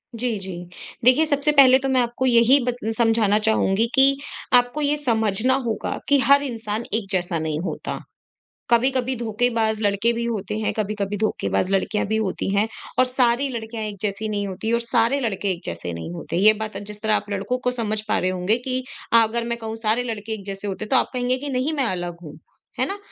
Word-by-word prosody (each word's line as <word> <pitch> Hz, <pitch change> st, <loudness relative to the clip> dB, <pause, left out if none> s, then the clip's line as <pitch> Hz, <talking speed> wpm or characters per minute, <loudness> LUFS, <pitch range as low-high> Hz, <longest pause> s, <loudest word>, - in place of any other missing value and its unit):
जी, 230 Hz, -2 st, -2 dB
जी। 190 Hz, -2 st, -7 dB, 0.5 s
देखिए, 255 Hz, +6 st, +6 dB
सबसे 290 Hz, 0 st, +1 dB
पहले 270 Hz, -3 st, +7 dB
तो 270 Hz, 0 st, -2 dB
मैं 260 Hz, -1 st, +3 dB
आपको 240 Hz, +2 st, -2 dB
यही 245 Hz, +2 st, +6 dB
बत 245 Hz, -1 st, -1 dB, 0.2 s
समझाना 225 Hz, -3 st, +3 dB
चाहूँगी 220 Hz, 0 st, +2 dB
कि 275 Hz, 0 st, +6 dB, 0.4 s
आपको 245 Hz, +4 st, +3 dB
ये 290 Hz, 0 st, +3 dB
समझना 225 Hz, -3 st, +1 dB
होगा 225 Hz, -2 st, -3 dB
कि 285 Hz, -1 st, +5 dB
हर 280 Hz, +3 st, +4 dB
इंसान 225 Hz, -4 st, -4 dB
एक 220 Hz, -2 st, 0 dB
जैसा 175 Hz, -2 st, 0 dB
नहीं 155 Hz, -1 st, -2 dB
होता। -, -, -4 dB, 0.7 s
कभी-कभी 255 Hz, +2 st, +2 dB
धोखेबाज़ 225 Hz, -1 st, 0 dB
लड़के 205 Hz, +3 st, +2 dB
भी 235 Hz, 0 st, -3 dB
होते 210 Hz, -3 st, -3 dB
हैं, 220 Hz, -, -1 dB
कभी-कभी 205 Hz, -1 st, -2 dB
धोखेबाज़ 200 Hz, -2 st, -1 dB
लड़कियाँ 205 Hz, +2 st, 0 dB
भी 220 Hz, +1 st, 0 dB
होती 195 Hz, -3 st, -2 dB
हैं 205 Hz, +2 st, +2 dB, 0.3 s
और 255 Hz, -, +6 dB
सारी 250 Hz, +1 st, +1 dB
लड़कियाँ 225 Hz, -2 st, -5 dB
एक 210 Hz, -1 st, -5 dB
जैसी 210 Hz, +1 st, -2 dB
नहीं 205 Hz, -1 st, -1 dB
होतीं 195 Hz, +4 st, -3 dB
और 235 Hz, -, +2 dB
सारे 235 Hz, +3 st, +1 dB
लड़के 205 Hz, -5 st, -1 dB
एक 175 Hz, -, -4 dB
जैसे 85 Hz, 0 st, -5 dB
नहीं 80 Hz, 0 st, -6 dB
होते। 165 Hz, -, -5 dB
ये 215 Hz, +3 st, +6 dB
बात 220 Hz, 0 st, -5 dB
जिस 210 Hz, 0 st, -7 dB
तरह 215 Hz, -1 st, +2 dB
आप -, -, -1 dB
लड़कों 205 Hz, +5 st, -2 dB
को 250 Hz, -, +1 dB
समझ 215 Hz, -3 st, -2 dB
पा -, -, +1 dB
रहे 185 Hz, -, 0 dB
होंगे 185 Hz, +4 st, +1 dB
कि 255 Hz, +1 st, -3 dB, 0.3 s
अ, -, -, +6 dB
अगर 230 Hz, +2 st, 0 dB
मैं 235 Hz, 0 st, -1 dB
कहूँ 225 Hz, -1 st, -6 dB
सारे 225 Hz, +3 st, +1 dB
लड़के 220 Hz, -2 st, -5 dB
एक 205 Hz, -3 st, -8 dB
जैसे 195 Hz, 0 st, -6 dB
होते 195 Hz, +2 st, -4 dB
हैं -, -, -13 dB
तो -, -, +2 dB
आप -, -, +1 dB
कहेंगे 250 Hz, 0 st, +1 dB
कि 285 Hz, +2 st, -5 dB
नहीं 265 Hz, +4 st, -1 dB
मैं 275 Hz, -4 st, 0 dB
अलग 175 Hz, -4 st, -3 dB
हूँ, 150 Hz, -1 st, -10 dB, 0.4 s
है -, -, +3 dB
ना? 395 Hz, -, -4 dB
225 Hz, 215 wpm, -22 LUFS, 205-250 Hz, 0.7 s, पहले